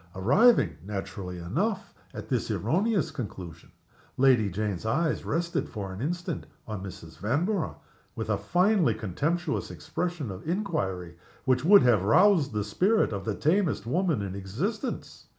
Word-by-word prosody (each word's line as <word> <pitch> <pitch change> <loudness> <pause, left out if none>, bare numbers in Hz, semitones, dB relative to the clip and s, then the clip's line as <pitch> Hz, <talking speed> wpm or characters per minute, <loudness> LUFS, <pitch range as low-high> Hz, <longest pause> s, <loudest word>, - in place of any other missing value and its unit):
Arriving, 165 - +4
naturally 95 -2 -5
enough, 170 - -2 0.2
at - - -8
this - - -1
erroneous 175 - +1
conclusion, 95 - -7 0.5
Lady 125 -6 +4
Jane's 100 -1 -3
eyes 155 +9 0
rested 170 +2 -1
for 100 -3 -5
an 95 - -7
instant 175 +5 -3 0.2
on 105 -4 -5
Mrs. 85 -4 -10
Vanborough 160 - 0 0.4
with 110 - -4
a - - +3
finely 175 - +2
contemptuous 150 - -2
expression 175 - -4
of 95 - -7
inquiry 95 - -2 0.3
which 130 0 +2
would 200 +5 +7
have 120 -6 +4
roused 165 - +4
the 105 -1 -1
spirit 185 - +2
of 100 -1 -4
the 110 -2 -1
tamest 165 - +1
woman 160 - 0
in 95 -2 -4
existence. 150 - -4
125 Hz, 140 wpm, -28 LUFS, -, 0.5 s, would